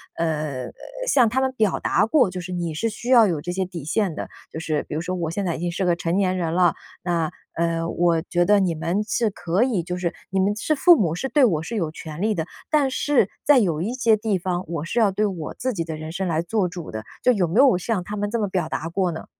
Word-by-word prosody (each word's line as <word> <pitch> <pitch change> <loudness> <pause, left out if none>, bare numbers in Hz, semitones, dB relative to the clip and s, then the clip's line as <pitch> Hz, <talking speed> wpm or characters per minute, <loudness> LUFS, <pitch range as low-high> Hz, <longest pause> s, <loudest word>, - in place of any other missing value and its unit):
呃， 150 -6 -2 0.4
向 255 - +5
他 260 +3 0
们 265 0 +1
表 215 -6 +1
达 - - +2
过， 250 -4 +3
就 180 - -6
是 180 +1 -7
你 175 -3 -2
是 230 +9 0
需 230 +3 -7
要 235 -3 +7
有 165 -6 -1
这 175 +3 -4
些 190 +1 -1
底 175 -5 -7
线 190 +2 0
的， - - -5 0.2
就 160 - -5
是 155 -2 -1
比 - - -9
如 160 - -1
说 180 +2 -3
“我 165 -2 -2
现 200 +3 -2
在 170 - -1
已 - - -6
经 175 0 -2
是 190 +3 -2
个 175 -1 +3
成 170 0 -1
年 185 -2 +1
人 165 -2 -1
了， 175 -1 +4 0.3
那， 170 -3 0 0.2
呃， 165 0 -1
我 170 -2 +2
觉 175 +1 0
得 205 +1 +5
你 180 -4 +1
们 170 +6 -1
是 220 +1 0
可 180 +4 0
以 235 -9 +1
就 180 +1 -4
是 175 -2 -2 0.2
你 190 - 0
们 200 +2 +2
是 305 +8 0
父 345 +4 +7
母， 170 -7 +1
是 265 - -2
对 290 -3 +4
我 160 -8 +1
是 230 - -5
有 170 -7 -1
权 160 +1 -8
利 215 0 +1
的， 160 - -2 0.2
但 290 -4 +2
是 260 -7 +2
在 290 -2 +6
有 165 -7 0
一 225 +7 -2
些 235 -4 +3
地 210 -2 0
方， 180 0 -2
我 165 -2 -4
是 235 - -1
要 215 -3 +5
对 210 +3 0
我 180 -7 -4
自 255 -1 -2
己 170 -4 -2
的 160 -1 -5
人 155 +1 -7
生 190 +2 -2
来 160 -2 +1
做 195 0 0
主 175 -3 -7
的。” 110 0 -5 0.2
就 250 - +5
有 190 -7 +1
没 195 +10 +1
有 270 -8 +6
向 185 +1 -2
他 205 +4 -6
们 205 0 -1
这么 215 -2 0
表 180 -4 -1
达 165 - -3
过 180 0 0
呢？ 160 - -7
180 Hz, 295 characters per minute, -23 LUFS, 165-215 Hz, 0.4 s, 要